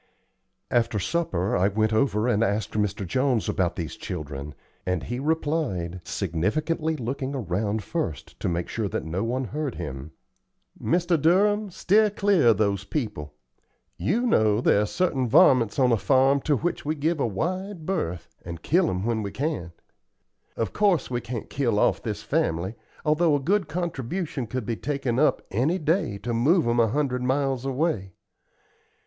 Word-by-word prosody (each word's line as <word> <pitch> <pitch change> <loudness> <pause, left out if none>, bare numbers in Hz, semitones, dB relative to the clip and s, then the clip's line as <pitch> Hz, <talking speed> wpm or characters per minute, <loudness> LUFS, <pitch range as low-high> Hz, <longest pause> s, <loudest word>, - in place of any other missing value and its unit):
After 115 -2 +2
supper 100 - 0
I 95 - +3
went 110 +2 +1
over 110 -1 +2
and 115 -2 +2
asked 105 -1 0
Mr. 105 -2 -1
Jones 130 +3 +1
about 90 -4 0
these 80 -3 -4
children, 70 -1 -6 0.3
and 90 -4 -1
he 120 +7 -4
replied, 145 - -1
significantly, 105 - -1
looking 135 +1 -3
around 105 -1 -1
first 85 - -4
to - - -1
make 85 0 -2
sure 110 -3 -2
that - - -3
no 85 +5 -2
one 125 +3 -1
heard 145 +2 -3
him: 70 -4 -6 0.7
"Mr. 170 -2 +1
Durham, 205 +6 +3
steer 210 +4 +3
clear 200 - +2
of 115 -4 +5
those 100 -2 +1
people. 100 - -4 0.6
You 240 +4 0
know 110 - +3
there 105 -3 +3
are 105 - 0
certain 135 - 0
varmints 130 - +5
on 130 -3 +4
a 115 - +4
farm 135 +3 +3
to 145 - +4
which 175 +7 -2
we 155 +2 -1
give 155 +2 0
a 130 - +1
wide 180 - -3
berth 90 - -2 0.2
and 85 -1 -8
kill 175 +1 +3
'em 90 +2 -2
when 115 -1 0
we 100 - -3
can. 130 - -3 0.9
Of 115 - -2
course 200 -9 +2
we 120 -1 -1
can't 120 -1 -5
kill 120 -6 0
off - - +2
this - - -4
family, 85 +5 0 0.3
although 155 0 +3
a - - +1
good 190 +7 +1
contribution 165 -4 -3
could 125 +1 -4
be 115 0 -2
taken 135 -4 -1
up 155 - +3
any 135 - +1
day 160 - 0
to 120 - -2
move 145 +7 +3
'em 120 0 +2
a 115 - +5
hundred 125 +1 0
miles 135 0 0
away. 130 - -1
125 Hz, 165 wpm, -25 LUFS, 100-155 Hz, 0.9 s, of